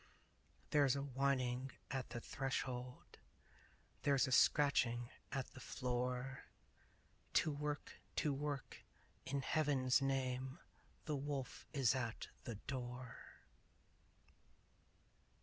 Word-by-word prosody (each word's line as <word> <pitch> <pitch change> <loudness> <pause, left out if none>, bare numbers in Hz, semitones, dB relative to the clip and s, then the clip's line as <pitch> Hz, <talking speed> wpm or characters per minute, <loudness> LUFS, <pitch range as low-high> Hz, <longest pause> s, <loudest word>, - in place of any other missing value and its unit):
There's 140 -3 +5
a 140 - -1
whining 130 -2 +1 0.2
at 135 -3 -2
the 120 - -4
threshold 125 -1 -3 0.8
There's 140 -2 +4
a - - -2
scratching 125 -4 +4 0.2
at 135 -2 -2
the - - -9
floor 125 +1 -2 0.9
To 155 - +4
work! 150 0 -3 0.2
To 150 - +2
work! 145 0 -3 0.4
In 140 +1 0
Heaven's 140 -4 +3
name! 130 0 0 0.5
The 150 - 0
wolf 140 -2 -3
is 135 -6 +4
at 120 -4 -2 0.2
the 115 - -3
door! 125 +1 -6
135 Hz, 95 wpm, -40 LUFS, 125-140 Hz, 0.9 s, There's